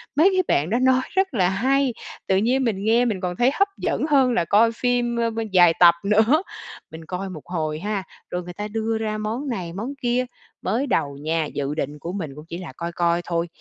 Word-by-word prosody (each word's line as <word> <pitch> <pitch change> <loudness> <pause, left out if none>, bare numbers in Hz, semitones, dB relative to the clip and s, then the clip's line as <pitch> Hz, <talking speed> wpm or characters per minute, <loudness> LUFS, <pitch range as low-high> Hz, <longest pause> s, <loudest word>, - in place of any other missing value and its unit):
mấy 320 +7 +6
cái 370 0 +2
bạn 145 +4 +1
đó 235 +4 +1
nói 260 0 +4
rất 385 -3 +1
là 185 -6 +2
hay, 260 +6 +1 0.3
tự 190 - +3
nhiên 250 +6 +2
mình 205 -5 -1
nghe 230 +3 +3
mình 210 -6 -1
còn 180 -1 -2
thấy 245 +6 +3
hấp 395 +5 +2
dẫn - - -1
hơn 270 -4 +4
là 175 - +1
coi 220 +5 +4
phim, 240 0 0
ơ, 230 0 +1
bơ 225 0 -3
dài 175 -3 +6
tập 170 -1 +8
nữa. 220 - +3 0.5
Mình 160 0 -10
coi 185 +3 -4
một 165 -5 -8
hồi 155 -3 -3
ha, 205 +1 -2 0.3
rồi 180 0 -3
người 175 0 -8
ta 210 +3 -5
đưa 220 +1 -2
ra 215 -1 -2
món 220 +7 -3
này 180 -8 -4
món 225 +9 -4
kia. 245 +1 +1 0.4
Mới 255 +6 -1
đầu 140 - 0
nha, 160 +2 -1
dự 145 0 -3
định 150 -1 -4
của 170 +5 -5
mình 170 -7 -4
cũng 150 +1 -11
chỉ 170 - -5
là 175 -7 -8
coi 170 0 -4
coi 170 0 +1
thôi, 170 0 -1
205 Hz, 235 wpm, -23 LUFS, 170-245 Hz, 0.5 s, tập